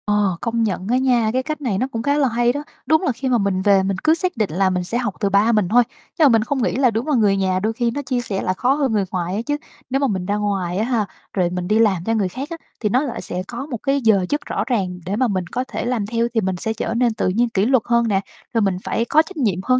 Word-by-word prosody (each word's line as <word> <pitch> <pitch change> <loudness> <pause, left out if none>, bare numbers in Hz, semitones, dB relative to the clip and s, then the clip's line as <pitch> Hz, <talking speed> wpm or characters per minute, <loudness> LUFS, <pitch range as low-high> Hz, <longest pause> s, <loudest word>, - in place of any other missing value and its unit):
Ờ, 205 -4 +1
công 230 -1 0
nhận 190 -3 -2
á 250 - +3
nha, 245 -4 +2
cái, 260 +1 0
cách 305 +1 -4
này 230 -8 -1
nó 255 +6 0
cũng 225 0 -3
khá 285 +2 +2
là 285 -2 +3
hay 240 0 +1
đó, 290 +2 -4 0.2
đúng 315 0 +3
là 355 - +1
khi 260 +2 -3
mà 245 - +3
mình 195 -3 0
về 195 -1 +4
mình 195 0 -1
cứ 315 - +5
xác 360 -3 -2
định 215 -3 +1
là 190 +2 +2
mình 180 -1 -1
sẽ 210 +7 -1
học 235 -5 -1
từ 200 - +1
ba 200 +4 +3
mình 210 -5 +2
thôi 245 +3 +5 0.4
nhưng 315 - +6
mà - - +7
mình 225 -3 +4
không 265 +1 -1
nghĩ - - 0
là 255 -2 +3
đúng 225 +5 -2
là 300 - +2
người 205 -4 +3
nhà 185 -1 +1
đôi 220 +1 +1
khi 235 0 0
nó 285 - -3
chia 255 -3 -1
sẻ 200 -5 -3
lại 185 - 0
khó 255 +2 +2
hơn 280 -3 0
người 205 -2 +2
ngoài 180 0 -2
á 215 - -1
chứ. 290 0 0 0.3
Nếu 270 +1 +1
mà 280 - +2
mình 190 -6 -2
ra 205 +2 0
ngoài 195 -4 -1
á 210 - +1
ha, 235 -4 0 0.3
rồi 180 -3 +1
mình 180 0 -3
đi 215 +3 +2
làm 195 -6 +3
cho 225 - +1
người 210 -4 +1
khác 270 - -6
á 335 - -5 0.2
thì 210 - 0
nó 250 +5 +2
lại 265 -5 -4
sẽ 180 +1 -4
có 245 +3 -5
một 270 -5 -4
cái 275 0 +1
giờ 210 -5 +3
giấc 290 0 -1
rõ - - -2
ràng 190 -8 -1
để 195 +3 -2
mà 255 +3 +2
mình 185 -5 -2
có 250 +8 -2
thể - - -4
làm 240 -4 -1
theo, 230 +2 0
thì 225 - +2
mình 190 -2 -1
sẽ 220 +5 -2
trở 225 0 -3
nên 235 -1 +2
tự - - -1
nhiên 235 +6 +1
kỷ 200 -3 +1
luật 255 -1 +3
hơn 235 -1 +2
nè 195 -3 +1 0.3
rồi 230 - +2
mình 195 -3 +1
phải 230 - -1
có 305 +5 +4
trách 320 +3 -10
nhiệm 215 - +1
hơn, 255 +3 +3
225 Hz, 320 wpm, -21 LUFS, 195-255 Hz, 0.4 s, mà